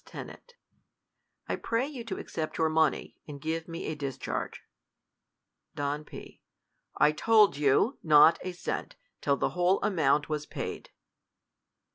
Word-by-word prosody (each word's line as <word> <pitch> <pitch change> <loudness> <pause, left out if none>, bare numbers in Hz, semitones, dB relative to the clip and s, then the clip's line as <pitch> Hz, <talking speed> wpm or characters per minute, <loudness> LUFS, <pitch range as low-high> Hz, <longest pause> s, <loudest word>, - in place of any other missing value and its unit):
Ten. - - -9 1.1
I - - -1
pray 230 +3 -1
you 270 -5 -7
to 195 -4 -4
accept 155 -2 -5
your 160 -1 +2
money, 155 -3 0
and 145 -2 -8
give 160 +2 -3
me 165 0 -6
a - - -2
discharge. 135 -3 -4 1.1
Don 145 +1 -2
P. - - -11 0.6
I 150 - +5
told 210 +3 +4
you, 145 - +2
not 155 +1 +6
a 185 - -4
cent, 175 - -4 0.3
till 140 -1 +1
the - - 0
whole 180 +2 +2
amount 150 -7 +2
y 155 - -2
was 150 0 -4
paid. - - -6
155 Hz, 140 wpm, -29 LUFS, 145-185 Hz, 1.1 s, not